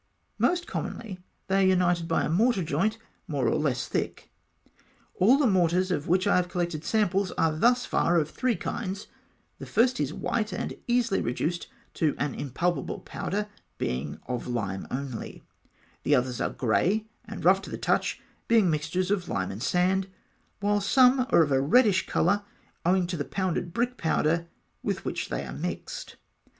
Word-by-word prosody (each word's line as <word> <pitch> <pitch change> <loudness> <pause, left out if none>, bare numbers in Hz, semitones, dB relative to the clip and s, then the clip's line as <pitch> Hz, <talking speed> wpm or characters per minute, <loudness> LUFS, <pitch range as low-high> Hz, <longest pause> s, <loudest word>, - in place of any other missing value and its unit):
Most 350 0 +2
commonly, 205 -6 -5 0.3
they 195 0 +2
are - - +5
united 175 -2 +2
by 165 - +1
a - - 0
mortar 200 +4 +2
joint, 180 +9 0 0.3
more 140 -5 0
or - - +2
less 130 -5 0
thick. - - -3 0.8
All 230 +9 +5
the 290 - +2
mortars 185 -3 +2
of 150 -4 -1
which 185 +2 +2
I 200 - +4
have 180 0 0
collected 170 -3 -2
samples 200 -2 +1
are 160 -1 +1
thus 245 +8 +3
far 175 - +2
of 155 -3 +2
three 245 +8 0
kinds: 195 +2 -4 0.5
the - - -8
first 250 +2 +2
is 145 -1 0
white, 215 +6 -2
and - - -3
easily 240 -4 +2
reduced 160 +8 -2 0.3
to 155 -3 +1
an 145 -1 -1
impalpable 145 +3 -2
powder, 210 +2 -3 0.3
being 65 +4 -3
of 125 -1 -4
lime 100 -6 -3
only; 130 -3 -5 0.6
the 145 - +3
others 125 -1 0
are - - +1
grey, 185 - +1 0.2
and - - -7
rough - - +6
to - - -9
the - - -5
touch, - - 0 0.3
being 220 -7 +4
mixtures 165 +5 -1
of 185 -4 -1
lime 95 0 -1
and 100 +3 -7
sand; 185 +5 +1 0.5
while 205 0 +2
some 255 +4 +4
are 165 - +6
of 145 - -2
a 135 0 +3
reddish 190 - +4
colour, 200 +5 +2 0.5
owing 185 0 +3
to 175 0 -3
the 145 - -1
pounded 180 0 -2
brick 240 +5 -1
powder 165 +1 +1 0.3
with - - -3
which - - -3
they - - -3
are - - -7
mixed. - - -5
180 Hz, 170 wpm, -27 LUFS, 150-205 Hz, 0.8 s, rough